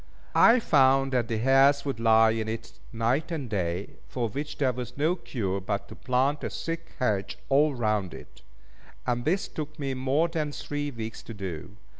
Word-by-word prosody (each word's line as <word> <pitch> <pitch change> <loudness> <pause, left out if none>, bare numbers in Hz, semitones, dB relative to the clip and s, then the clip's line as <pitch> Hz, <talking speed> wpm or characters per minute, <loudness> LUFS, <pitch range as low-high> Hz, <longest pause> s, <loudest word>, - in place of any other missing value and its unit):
I 235 +2 +7
found 135 - +4
that 120 -3 +1
the 115 - -1
hares 135 +4 +4
would 135 -5 -3
lie 110 -1 +5
in 110 -1 -2
it 110 +1 -5 0.2
night 120 +8 0
and 155 -7 -3
day, 90 -3 -3
for 120 -3 -2
which 145 +7 -5
there 130 -3 +2
was 125 0 -7
no 155 +5 +2
cure 100 - -3
but 100 +1 -3
to - - -9
plant 135 +3 0
a - - -1
thick 165 0 -5
hedge 105 -6 -1
all 145 +1 +4
round 105 -6 -1
it; - - -13 0.6
and 120 -1 -1
this 185 +6 +1
took 155 0 -6
me 140 -3 -2
more 135 +5 +1
than 155 -3 -2
three 145 0 -3
weeks 115 -4 -6
to 115 - -9
do. 95 0 -6
130 Hz, 185 wpm, -27 LUFS, 110-145 Hz, 0.6 s, I